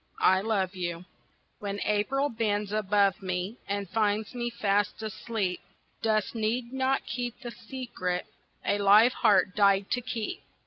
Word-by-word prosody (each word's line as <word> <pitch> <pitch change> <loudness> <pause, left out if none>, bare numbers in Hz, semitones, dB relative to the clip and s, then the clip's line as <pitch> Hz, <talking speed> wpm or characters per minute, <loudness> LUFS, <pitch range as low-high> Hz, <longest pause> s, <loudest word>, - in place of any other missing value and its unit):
"I 190 0 +5
Love 200 -3 0
You" 175 -1 -4 0.5
When 200 0 -4
April 260 +7 +1
bends 210 -3 -1
above 205 -2 +2
me 185 +4 -3
And 200 0 -2
finds 210 +2 0
me 240 -1 -2
fast 205 -2 0
asleep, 215 -3 -2 0.4
Dust 215 -2 +1
need 235 +2 -1
not 265 0 +1
keep 245 0 -4
the 240 -2 -6
secret 225 -8 -4 0.4
A 205 - +1
live 210 +5 +6
heart 190 -2 +3
died 200 -1 +3
to 245 - +1
keep. 230 -3 -4
210 Hz, 140 wpm, -28 LUFS, 195-235 Hz, 0.5 s, live